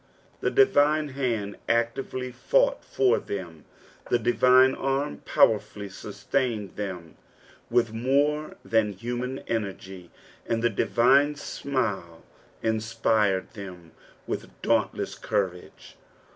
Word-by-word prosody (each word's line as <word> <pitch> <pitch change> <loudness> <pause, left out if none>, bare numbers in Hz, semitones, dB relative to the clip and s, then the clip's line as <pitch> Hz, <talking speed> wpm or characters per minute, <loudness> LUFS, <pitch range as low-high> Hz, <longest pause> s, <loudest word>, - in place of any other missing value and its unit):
The - - 0
divine 150 - +3
liand 115 -7 -2
actively 125 +2 -1
fought - - +1
for 400 -2 +2
them, 85 -6 -7 0.4
the 120 - +4
divine 125 +3 +5
arm 135 +2 -1
powerfully 105 -2 +2
sustained 110 0 -3
tbem 90 -5 -6 0.6
with 115 -2 +2
more 145 +6 +1
than 110 -2 +2
human 125 +6 -4
energy, 95 -5 -4 0.4
and 115 0 -1
the 120 - +3
divine 135 +7 +3
tmiU 105 - -3 0.4
inspired 110 -3 +1
them 90 -6 -10 0.3
with - - -4
dauntless - - 0
courage. 90 -3 -4
115 Hz, 100 wpm, -26 LUFS, 100-135 Hz, 0.6 s, divine